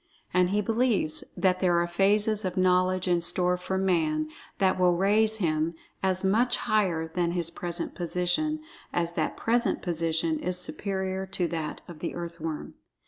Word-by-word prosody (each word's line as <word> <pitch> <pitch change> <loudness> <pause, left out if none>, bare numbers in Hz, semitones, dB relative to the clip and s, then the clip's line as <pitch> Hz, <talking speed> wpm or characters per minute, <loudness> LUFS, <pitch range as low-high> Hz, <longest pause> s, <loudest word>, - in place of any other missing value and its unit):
And 180 0 +3
he 205 +2 +1
believes 225 -6 +1
that 185 -1 +2
there 180 -2 +3
are 170 - +2
phases 205 +4 +2
of 185 0 -3
knowledge 185 0 +2
in 175 -1 +2
store 180 +1 +2
for 185 +1 -3
Man 155 -5 +1 0.3
that 190 -1 +2
will 180 -1 +4
raise 215 +3 +3
him 160 -3 0 0.3
as 190 -1 +2
much 240 +6 +3
higher 190 -8 +1
than 170 +1 -1
his 170 -2 0
present 175 0 -4
position, 180 - -1 0.3
as 170 -1 -1
that - - -2
present 235 +1 +1
position 165 -2 0
is 180 +1 +3
superior 190 0 -2
to 185 -2 -1
that 160 -2 -4
of 170 -3 -10
the 170 - -4
earthworm. 170 -2 -5
180 Hz, 160 wpm, -27 LUFS, 170-195 Hz, 0.3 s, will